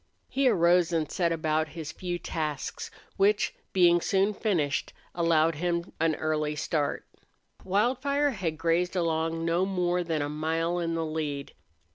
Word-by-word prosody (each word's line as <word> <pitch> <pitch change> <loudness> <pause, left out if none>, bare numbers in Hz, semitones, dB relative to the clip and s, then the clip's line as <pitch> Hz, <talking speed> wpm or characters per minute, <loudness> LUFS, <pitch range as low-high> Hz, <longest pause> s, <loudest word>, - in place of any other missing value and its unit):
He 270 -1 +3
arose 175 -3 +4
and 160 -2 -1
set 170 -2 +1
about 155 -1 0
his 160 -1 -5
few 175 +1 -4
tasks, 155 -5 -4 0.3
which, 205 +2 +3 0.2
being 175 -2 +5
soon 195 +4 +2
finished, 170 -10 -1 0.2
allowed 165 -1 +3
him 170 +2 -2
an 160 -1 +2
early 155 -1 -1
start. 150 -1 -1 0.6
Wildfire 260 +9 +1
had 175 -9 -3
grazed 170 +3 +1
along 165 -1 0
no 170 +2 +2
more 180 -2 0
than 160 -3 -1
a - - -2
mile 165 +3 -1
in 165 -1 -1
the 165 0 -1
lead. 150 -3 -4
165 Hz, 145 wpm, -28 LUFS, 160-180 Hz, 0.6 s, being